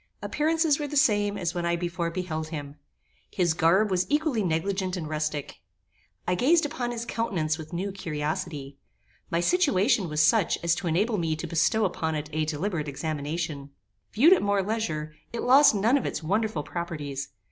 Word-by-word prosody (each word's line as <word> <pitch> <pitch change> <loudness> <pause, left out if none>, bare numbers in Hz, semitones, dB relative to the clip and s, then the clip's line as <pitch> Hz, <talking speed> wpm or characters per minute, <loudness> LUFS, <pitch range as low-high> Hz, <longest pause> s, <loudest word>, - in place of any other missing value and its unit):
Appearances 315 0 +1
were 295 - -2
the 295 - -2
same 205 -5 +3
as 175 -3 -2
when 175 -1 -3
I 170 0 +1
before 170 0 -2
beheld 165 -3 -4
him. 145 -3 -6 0.6
His 175 -3 +1
garb 185 +6 +3
was 185 -1 +1
equally 295 -5 +1
negligent 185 +2 -1
and 160 -3 -4
rustic. 155 -1 -3 0.7
I 180 - +2
gazed 300 - +3
upon 270 -5 -3
his 235 -1 -4
countenance 170 -10 -1
with 155 0 -9
new 185 +3 -3
curiosity. 150 -4 -4 0.5
My 170 0 0
situation 225 - +2
was 150 0 -2
such 195 +3 +3
as 170 -1 +3
to 175 +1 -3
enable 205 +6 +1
me 165 -2 0
to 160 - -5
bestow 170 +7 +2
upon 160 -3 -2
it 150 0 -5
a 155 0 0
deliberate 155 +1 -2
examination. 150 0 -4 0.4
Viewed 300 - +6
at 380 - +3
more 200 -1 +1
leisure, 170 -8 -3 0.2
it 235 - -4
lost 265 -1 +6
none 225 +8 +3
of - - -3
its - - -4
wonderful 205 -1 0
properties. 145 -6 -5
175 Hz, 175 wpm, -27 LUFS, 155-220 Hz, 0.7 s, Viewed